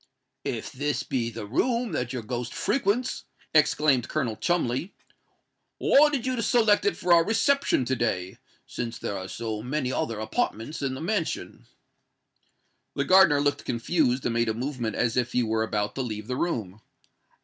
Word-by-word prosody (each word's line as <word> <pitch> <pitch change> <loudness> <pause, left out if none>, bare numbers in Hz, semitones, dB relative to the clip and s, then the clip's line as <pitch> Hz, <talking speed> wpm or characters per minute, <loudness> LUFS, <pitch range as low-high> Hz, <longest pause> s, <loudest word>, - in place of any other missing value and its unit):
"If - - -3
this 145 +2 -2
be 120 -3 -1
the 115 -2 -7
room 235 - 0
that 125 -1 -2
your 125 -3 -4
ghost 120 +1 -4
frequents," 245 0 0 0.3
exclaimed 150 -4 +3
Colonel 125 -8 -1
Cholmondeley, 170 - -1 0.8
"why 300 +2 +5
did 270 -5 -2
you 255 -2 -1
select 225 - +3
it 410 - +1
for 175 0 +3
our 170 -1 +6
reception 225 - +2
to 130 - 0
day, 95 -6 -2 0.3
since 120 -1 -5
there 100 - -4
are 95 -1 -5
so 110 0 -4
many 130 +2 -2
other 115 -4 -2
apartments 110 +5 -2
in 135 -2 -1
the 130 - -7
mansion?" 180 -1 -3 1.3
The 140 - 0
gardener 180 -4 +6
looked 145 0 0
confused, 125 +1 0
and 120 - 0
made 115 -1 +1
a 110 - -1
movement 120 -3 -3
as 120 +1 0
if 125 0 0
he 125 - +2
were 110 0 0
about 105 -2 -1
to 135 - -3
leave 110 -4 -4
the 125 - -3
room. 110 - -3
130 Hz, 170 wpm, -26 LUFS, 115-175 Hz, 1.3 s, our